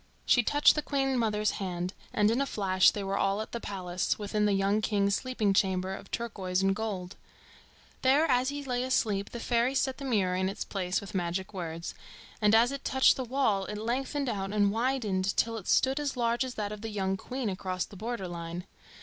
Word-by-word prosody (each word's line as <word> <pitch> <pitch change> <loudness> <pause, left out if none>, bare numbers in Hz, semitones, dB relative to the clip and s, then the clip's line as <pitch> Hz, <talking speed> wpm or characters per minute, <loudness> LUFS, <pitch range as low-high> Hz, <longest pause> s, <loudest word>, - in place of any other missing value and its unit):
She 245 - +5
touched 290 +5 +5
the 300 - -1
Queen 270 -2 0
mother's 215 -3 +1
hand, 180 -1 -3 0.2
and 210 0 +3
in 240 +4 +1
a 275 - 0
flash 190 -5 +4
they 205 - -4
were 195 +1 -1
all 195 +1 +1
at 220 - -5
the 235 - -3
palace, 185 -4 -2
within 210 0 0
the 205 - +2
young 195 +2 +2
king's 200 -2 +1
sleeping 220 -3 0
chamber 190 -1 +1
of - - -9
turquoise 195 -5 -2
and 195 0 +3
gold. 200 -4 -4 0.8
There 275 +5 +4
as 255 -2 +2
he 285 0 -4
lay 250 -2 -1
asleep 215 -6 0
the 235 - -7
fairies 240 +3 +1
set 265 0 -1
the 275 - -6
mirror 200 -8 +1
in 185 +1 0
its 195 - -4
place 185 -1 -2
with 200 - -9
magic 185 +1 -2
words, 165 -3 -5 0.5
and 210 +1 +5
as 235 +3 +5
it 275 0 -5
touched 265 0 +4
the 260 - -3
wall 240 -6 +1
it 210 - -5
lengthened 265 +5 -2
out 195 -4 -2
and 205 -1 +3
widened 215 -5 0
till 230 0 +2
it 215 -5 -7
stood 265 +2 +3
as 285 -3 -2
large 235 +1 +1
as 255 -1 -5
that 210 -1 -3
of 210 -1 -7
the 225 - -4
young 195 -2 -1
queen 255 +5 -4
across 185 -2 -2
the - - -14
border 220 -1 -4
line. 170 +1 -6
210 Hz, 215 wpm, -29 LUFS, 195-245 Hz, 0.8 s, She